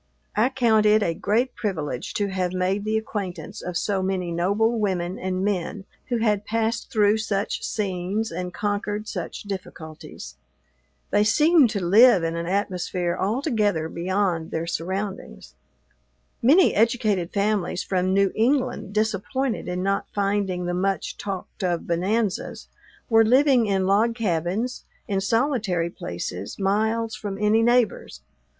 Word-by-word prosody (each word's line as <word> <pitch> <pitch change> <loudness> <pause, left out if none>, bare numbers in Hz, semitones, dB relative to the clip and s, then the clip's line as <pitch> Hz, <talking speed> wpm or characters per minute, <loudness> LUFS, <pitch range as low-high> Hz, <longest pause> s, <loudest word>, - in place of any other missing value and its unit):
I 220 +4 +3
count 230 -5 +3
it 210 0 +4
a 170 - 0
great 230 +9 0
privilege 155 - -4
to 205 -1 0
have 185 -1 -2
made 185 +3 -1
the 215 +1 +1
acquaintance 195 -6 -5
of 180 -1 -3
so 200 -2 0
many 185 -2 -2
noble 205 +7 +1
women 185 -3 -1
and 185 +1 -2
men 195 0 -2 0.2
who 240 - 0
had 210 -3 +1
passed 225 +2 -1
through 210 0 +3
such 205 -2 -2
scenes 200 0 -2
and 180 +1 -4
conquered 205 +1 -2
such - - -5
difficulties. 160 - -8 0.7
They 205 0 +4
seemed 300 +5 +5
to 200 -5 -2
live 210 +1 +6
in 165 0 -1
an 170 0 -3
atmosphere 180 -2 -1
altogether 210 - 0
beyond 175 -1 -1
their 160 +1 -3
surroundings. 175 - -5 0.9
Many 315 +10 +5
educated 215 -6 +1
families 200 -3 0
from 185 -1 0
New 195 0 +3
England, 250 -3 0
disappointed 220 +4 -1
in 180 0 -2
not 195 +1 0
finding 195 -3 0
the 175 - -2
much 195 +2 -1
talked 195 0 -6
of 175 -2 -1
bonanzas, 190 +4 -1 0.4
were 225 -1 +5
living 255 0 +4
in 195 -2 +1
log 215 +4 +2
cabins, 205 +3 -1 0.2
in 195 -3 0
solitary 210 - 0
places, 90 - -6
miles 220 +3 0
from 205 -2 -5
any 210 +2 +3
neighbors. 235 - +1
200 Hz, 140 wpm, -24 LUFS, 180-220 Hz, 0.9 s, live